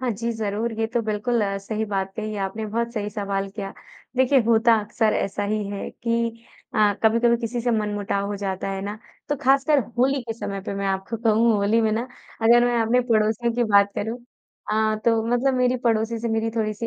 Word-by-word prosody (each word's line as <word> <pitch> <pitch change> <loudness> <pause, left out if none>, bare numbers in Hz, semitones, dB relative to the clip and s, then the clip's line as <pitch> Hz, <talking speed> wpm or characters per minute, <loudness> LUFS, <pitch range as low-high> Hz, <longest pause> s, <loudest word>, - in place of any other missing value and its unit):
हाँ 255 -1 0
जी, 230 +2 -2
ज़रूर। 220 +1 -2
ये 225 - +2
तो 235 +1 -1
बिल्कुल 220 +2 0
अ, 195 0 -2
सही 215 +2 -3
बात 195 -2 -2
कही 215 -1 -4
आपने 215 +3 -5
बहुत 235 +2 -2
सही 210 -2 -2
सवाल 200 -2 -2
किया। 195 -1 -6 0.4
देखिए 260 +2 +4
होता 230 0 +5
अक्सर 215 +1 0
ऐसा 200 +1 -1
ही 210 +1 -1
है 200 -1 -5
कि 230 0 -2 0.3
अ, 210 -2 +4
कभी-कभी 230 +1 +4
किसी 235 +1 -2
से 240 +1 0
मनमुटाव 205 -2 -1
हो 205 0 -3
जाता 195 -1 -3
है 195 0 -3
ना 205 +2 -5 0.3
तो 290 - 0
खासकर 275 +2 +4 0.2
होली 270 +2 +3
के 230 -1 -4
समय 200 -2 -4
पे - - -3
मैं 200 0 -2
आपको 195 +4 -2
कहूँ 225 +1 +4
होली 205 +3 +2
में 220 -1 +2
ना 225 +2 0 0.4
अगर 240 +2 +6
मैं 245 0 +1
आपने 230 +2 +3
पड़ोसियों 220 +2 +2
की 240 0 +2
बात 200 0 +5
करूँ। 225 +3 -3 0.5
हाँ, 215 0 +1
तो 225 0 +2
मतलब 245 +3 +2
मेरी 250 0 +2
पड़ोसी 225 0 +1
से 230 +1 -3
मेरी 225 0 0
थोड़ी-सी 215 +1 -1
220 Hz, 205 wpm, -23 LUFS, 205-235 Hz, 0.5 s, अगर